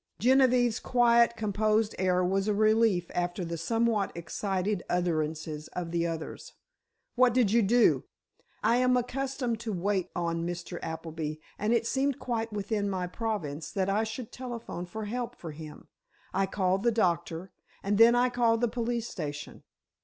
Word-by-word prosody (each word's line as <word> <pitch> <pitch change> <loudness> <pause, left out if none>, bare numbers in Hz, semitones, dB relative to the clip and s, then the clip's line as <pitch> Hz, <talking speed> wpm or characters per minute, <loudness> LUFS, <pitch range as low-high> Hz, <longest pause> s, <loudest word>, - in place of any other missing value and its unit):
Genevieve's 250 -2 +4
quiet, 235 -1 +4
composed 215 +1 +1
air 185 -1 +2
was 195 +2 0
a 210 - +2
relief 215 -3 +3
after 175 +1 -2
the 170 0 -4
somewhat 225 +4 0
excited 190 +3 -2
utterances 155 -3 -1
of 175 -2 -4
the 170 0 0
others. 165 - -6 0.6
"What 250 -1 +4
did 240 -6 +3
you 235 +1 +5
do?" 230 +4 +4 0.6
"I 230 +2 +4
am 250 0 +3
accustomed 250 -1 -2
to 230 -1 -4
wait 190 0 -1
on 170 -1 -1
Mr. 175 0 -5
Appleby, 160 -1 -4 0.2
and 210 +2 0
it 235 -1 +2
seemed 270 +2 0
quite 230 -2 -3
within 205 0 -1
my 185 -2 -2
province 175 -7 -4
that 190 -1 0
I 210 +3 +2
should 220 +1 -6
telephone 235 -8 -6
for 220 +4 -5
help 240 +3 -4
for 165 - -8
him. 155 0 -10 0.5
I 195 - +1
called 190 -1 0
the 235 +2 +3
doctor—and 185 +1 -2
then 230 +1 +8
I 245 +1 +3
called 235 -2 +2
the 240 - +3
police 235 0 -2
station." 150 -6 -6
210 Hz, 155 wpm, -29 LUFS, 175-235 Hz, 0.6 s, then